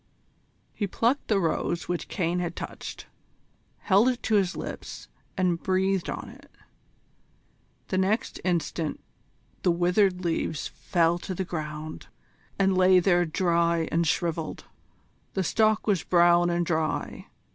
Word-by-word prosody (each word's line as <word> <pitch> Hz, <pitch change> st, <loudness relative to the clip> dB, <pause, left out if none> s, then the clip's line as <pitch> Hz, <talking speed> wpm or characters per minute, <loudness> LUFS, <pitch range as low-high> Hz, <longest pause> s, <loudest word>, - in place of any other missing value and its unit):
He 205 Hz, -, -2 dB
plucked 235 Hz, +8 st, 0 dB
the 210 Hz, -3 st, +2 dB
rose 170 Hz, 0 st, -1 dB
which 175 Hz, -1 st, -3 dB
Caine 175 Hz, -1 st, -1 dB
had 175 Hz, -1 st, -3 dB
touched, -, -, -7 dB, 0.8 s
held 205 Hz, +5 st, +4 dB
it 250 Hz, -2 st, -3 dB
to 220 Hz, -, -1 dB
his 195 Hz, -4 st, +2 dB
lips -, -, -7 dB, 0.3 s
and 180 Hz, -3 st, +1 dB
breathed 190 Hz, -1 st, 0 dB
on -, -, -5 dB
it. -, -, -14 dB, 1.4 s
The 185 Hz, -, 0 dB
next 200 Hz, +4 st, 0 dB
instant 170 Hz, -3 st, -1 dB, 0.6 s
the -, -, +2 dB
withered 180 Hz, +2 st, +2 dB
leaves 165 Hz, -2 st, -1 dB
fell 170 Hz, -2 st, +1 dB
to 185 Hz, +1 st, -5 dB
the 190 Hz, -, -2 dB
ground, 155 Hz, -2 st, -6 dB, 0.5 s
and 195 Hz, -1 st, +2 dB
lay 185 Hz, 0 st, +6 dB
there 175 Hz, -1 st, +3 dB
dry 170 Hz, 0 st, +1 dB
and 170 Hz, 0 st, +1 dB
shrivelled. 165 Hz, -1 st, -2 dB, 0.7 s
The 190 Hz, -, +1 dB
stalk 215 Hz, +4 st, +2 dB
was 200 Hz, -5 st, +1 dB
brown 175 Hz, 0 st, +4 dB
and 175 Hz, 0 st, 0 dB
dry. 160 Hz, -2 st, -2 dB
175 Hz, 135 wpm, -27 LUFS, 170-190 Hz, 1.4 s, lay